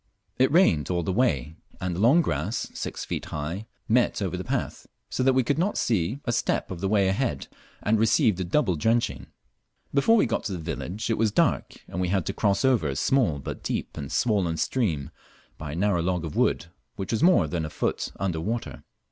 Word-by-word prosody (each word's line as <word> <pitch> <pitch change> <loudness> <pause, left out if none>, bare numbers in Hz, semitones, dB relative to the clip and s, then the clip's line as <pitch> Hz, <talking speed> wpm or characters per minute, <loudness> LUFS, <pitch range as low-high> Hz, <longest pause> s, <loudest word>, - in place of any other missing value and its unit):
It 130 +1 +4
rained 115 - +4
all 90 -1 0
the 95 - -1
way, 80 - 0 0.2
and 90 -2 -2
the - - -4
long 135 - +5
grass, 85 - -2
six - - -5
feet - - -4
high, 85 +9 -5 0.2
met - - +2
over - - -2
the - - -4
path; - - -3 0.2
so - - -1
that 130 +1 +4
we 130 0 +3
could 145 +6 0
not 195 +5 0
see 110 +3 0
a 120 - 0
step 115 - 0
of 90 -2 -6
the 95 - 0
way 100 -1 +3
ahead, 115 +6 -1 0.4
and 110 0 +2
received 110 - +3
a - - 0
double 95 - +1
drenching. 75 - 0 0.7
Before 145 +12 +4
we - - +4
got - - -1
to 100 - -2
the - - -3
village 90 +6 -4
it 110 - 0
was 110 -2 +2
dark, - - +1
and 90 - -4
we 90 - +1
had 95 -1 0
to 95 - -2
cross 100 +4 +1
over 120 - +3
a 70 - -3
small 115 - +2
but 70 - -6
deep - - -3
and 70 0 -6
swollen 95 -6 +1
stream 80 - -1 0.5
by 75 -2 -5
a - - -4
narrow 95 -1 +1
log 90 -1 -1
of 80 - -6
wood, - - +2 0.3
which 95 - -4
was 115 - 0
more 175 - +5
than 80 +1 -2
a 75 - -4
foot - - -2
under 90 -5 -1
water. 115 +6 -4
95 Hz, 215 wpm, -26 LUFS, 85-120 Hz, 0.7 s, long